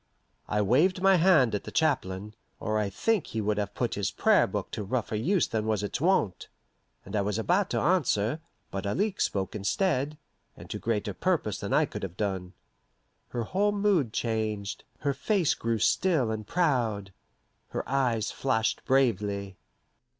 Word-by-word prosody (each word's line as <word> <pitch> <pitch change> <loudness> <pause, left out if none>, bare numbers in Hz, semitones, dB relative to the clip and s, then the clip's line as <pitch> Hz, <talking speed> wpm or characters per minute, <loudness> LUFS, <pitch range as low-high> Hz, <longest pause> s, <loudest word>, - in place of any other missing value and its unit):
I 105 0 +1
waved 155 - +3
my 195 0 +5
hand 160 -9 +5
at 105 - -1
the - - -8
chaplain, 105 -10 0 0.3
or 110 -1 -1
I 105 -2 0
think 205 - 0
he 110 - -4
would 105 0 0
have 100 - -3
put - - -1
his - - -1
Prayer - - +3
Book - - -4
to - - -4
rougher 115 +2 -2
use 165 - +2
than 110 -2 -2
was 105 -2 0
its 105 +5 -3
wont, 155 - +1 0.6
and - - -6
I 105 - +2
was 105 +1 -1
about 180 - +1
to - - 0
answer, 150 - +1 0.3
but 95 0 -3
Alixe 200 - 0
spoke 95 -2 -2
instead, 145 - 0 0.4
and - - -11
to - - -4
greater 110 -3 -1
purpose 160 - 0
than - - -5
I - - +4
could - - -7
have 95 -2 -6
done. 95 -3 -2 0.7
Her 120 - -3
whole 200 - +1
mood 200 - +2
changed, 110 -3 -2 0.2
her 140 -1 +1
face 175 +5 +1
grew 115 0 -1
still 140 - +2
and 110 -1 -4
proud, 120 - 0 0.5
her - - -4
eyes 120 -6 +1
flashed 115 -5 0
bravely. 105 -7 +1
115 Hz, 170 wpm, -28 LUFS, 105-165 Hz, 0.7 s, my